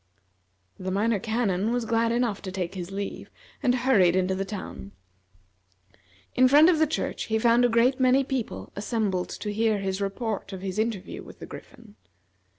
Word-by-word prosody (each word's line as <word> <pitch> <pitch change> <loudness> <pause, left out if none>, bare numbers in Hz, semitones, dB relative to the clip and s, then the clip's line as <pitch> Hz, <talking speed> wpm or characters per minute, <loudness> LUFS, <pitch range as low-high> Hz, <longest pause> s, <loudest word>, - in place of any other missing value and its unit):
The 185 - -4
Minor 205 +3 +1
Canon 220 -1 0
was 245 -1 -1
glad 230 0 +1
enough 235 -4 0
to 190 - -6
take 185 -2 -3
his 180 -2 -6
leave, 200 +1 -5 0.3
and 250 -1 +3
hurried 230 -9 +4
into 185 0 +1
the 190 +1 -1
town. 190 - -7 1.4
In 255 0 +5
front 295 +5 +7
of 320 - +1
the 315 - +4
church 315 - -3
he 220 - 0
found 235 +2 +4
a 245 - +4
great 240 +3 +3
many 260 +1 +4
people 240 - -4
assembled 205 -3 -1
to 210 -1 -5
hear 220 0 +2
his 195 0 -3
report 200 0 -3
of 190 - -6
his 195 +1 -3
interview 220 -4 -2
with - - -13
the - - -9
Griffin. 105 - -13
220 Hz, 175 wpm, -26 LUFS, 190-240 Hz, 1.4 s, front